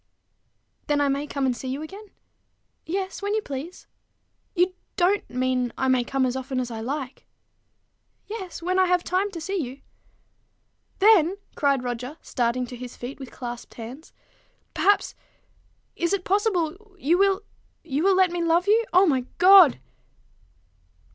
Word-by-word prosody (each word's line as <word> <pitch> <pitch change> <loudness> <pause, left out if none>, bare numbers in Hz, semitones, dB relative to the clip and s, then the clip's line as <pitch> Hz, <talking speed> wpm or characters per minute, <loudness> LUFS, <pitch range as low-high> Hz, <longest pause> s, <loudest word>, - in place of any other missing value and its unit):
"Then 295 -1 +2
I 285 -1 +2
may 280 +2 -1
come 280 -2 -2
and 255 -2 +1
see 260 - -7
you 270 +4 -3
again?" 395 +7 -10 0.8
"Yes: 380 +3 -3
when 405 +1 -1
you 435 - +1
please." 285 +6 -7 0.7
"You 365 +1 +2 0.2
don't 385 +3 +1
mean 250 -1 0
I 265 - +1
may 255 -1 +3
come 265 +1 0
as 255 0 -1
often 260 0 -3
as 245 -1 -3
I 220 -1 -5
like?" 265 +2 -5 1.0
"Yes 380 -6 -7
when 370 +2 +1
I 375 - +4
have 355 -1 +2
time 375 +3 0
to 360 -4 -7
see 385 +5 -3
you." 275 -4 -5 1.2
"Then," 390 -3 +5 0.2
cried 280 -3 +1
Roger, 250 +4 -5
starting 245 +1 -1
to 245 - -9
his 245 0 -9
feet 250 +4 -7
with 265 -2 -8
clasped 240 -1 -8
hands, 245 +7 -9 0.3
" - - -41
perhaps 405 +1 +2 0.8
is 340 +2 0
it 395 -2 0
possible? 390 -1 -1
you 340 +2 +2
will 395 +1 +3 0.4
you 290 -3 -2
will 385 +2 +4
let 370 -2 +4
me 350 0 -2
love 335 +2 +2
you? 445 +3 +4
O 370 +2 +6
my 260 -7 +1
God!" 365 -5 +8
320 Hz, 160 wpm, -25 LUFS, 260-375 Hz, 1.2 s, God